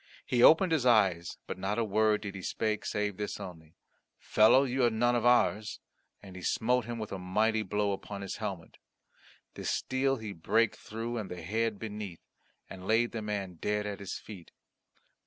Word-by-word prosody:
He 120 - +1
opened 165 +6 +7
his 155 -5 +2
eyes 95 -9 +3
but - - -6
not 95 +3 -2
a 115 - +2
word 110 0 +2
did 105 -2 -5
he 95 - -7
speak 110 +3 -2
save 105 -2 -2
this 105 -1 -4
only, 80 -3 -10 0.4
"Fellow, 110 +5 +5
you 130 -1 0
are 120 - +5
none 120 +2 +2
of 120 0 +2
ours," 115 -2 +2 0.4
and 95 -2 -11
he 90 - -8
smote 120 +3 +1
him 120 0 -5
a 105 -3 -5
mighty 110 +5 +1
blow 105 0 0
upon 100 +1 -5
his 100 - -5
helmet. 95 -6 -6 0.7
The - - -8
steel 135 +1 0
he 110 -3 -6
brake 110 +6 +1
through 115 +2 -5
and 100 -4 -5
the 90 -2 -7
head 110 +4 -1
beneath, 105 -5 -7 0.4
and 95 0 -9
laid 115 +2 +3
the 115 - -4
man 100 -5 -4
dead 105 0 0
at 100 -1 -4
his 100 - -5
feet. 95 -6 -11
105 Hz, 185 wpm, -30 LUFS, 100-115 Hz, 0.7 s, opened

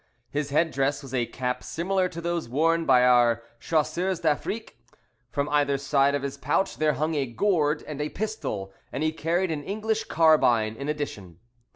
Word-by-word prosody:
His 145 0 -2
head 160 +3 +2
dress 140 +1 0
was 135 -1 -10
a 120 -2 0
cap 125 0 -3
similar 180 +7 0
to 170 -1 -7
those 170 -5 -2
worn 165 +5 +2
by 125 0 +6
our 120 -2 +4 0.2
Chasseurs 175 +3 0
d'Afrique. 165 - -2 0.5
From 140 +3 -1
either 145 -1 +2
side 140 0 +2
of 140 - -2
his 140 0 -4
pouch 195 - 0
there 155 -1 +2
hung 155 +4 -1
a 140 -3 0
gourd 150 - +1
and 150 -1 -6
a 150 - -2
pistol, 150 - -4 0.2
and 145 - -3
he 155 - +2
carried 170 +3 0
an 150 -2 -3
English 220 +4 -2
carbine 130 -9 +3
in 140 +5 -5
addition. 105 - -5
150 Hz, 180 wpm, -26 LUFS, 135-165 Hz, 0.5 s, by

